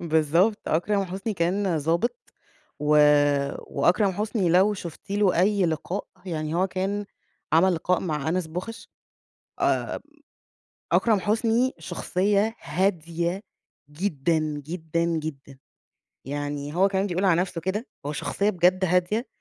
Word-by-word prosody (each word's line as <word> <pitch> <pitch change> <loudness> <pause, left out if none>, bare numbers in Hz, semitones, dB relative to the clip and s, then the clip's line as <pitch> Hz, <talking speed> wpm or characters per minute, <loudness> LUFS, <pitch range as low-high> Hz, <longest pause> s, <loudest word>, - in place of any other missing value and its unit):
بالضبط، 165 +6 +2
أكرم 195 +5 +1
حسني 195 +4 -4
كان 180 0 0
ضابط 170 +11 -1 0.5
و 150 - -3 0.8
وأكرم 180 +7 +2
حسني 205 -1 -1
لو 190 +5 +4
شُفتِ 175 -1 -9
له 200 -4 +3
أي 200 0 +3
لقاء، 165 +5 -3 0.2
يعني 155 -3 -3
هو 185 +2 +2
كان 195 +2 -2 0.5
عمل 175 +3 +5
لقاء 180 +2 0
مع 155 -4 -2
أنس 180 +1 0
بوخش، 180 +8 -7 0.7
آآ، - - 0 0.9
أكرم 220 -4 +3
حسني 225 +5 +1
شخصية 205 +4 0
هادية 170 +1 -1 0.5
جدًا، 160 -1 0 0.3
جدًا، 165 0 -2
جدًا، 155 -5 -4 0.7
يعني 145 +1 -4
هو 190 +2 +4
كمان 195 0 0
بيقول 185 +1 -1
على 175 -2 +4
نفسُه 180 -2 -4
كده، 195 +7 -2 0.2
هو 145 - -2
شخصية 200 +7 0
بجد 185 0 +3
هادية، 180 +7 +1
180 Hz, 125 wpm, -25 LUFS, 160-200 Hz, 0.9 s, عمل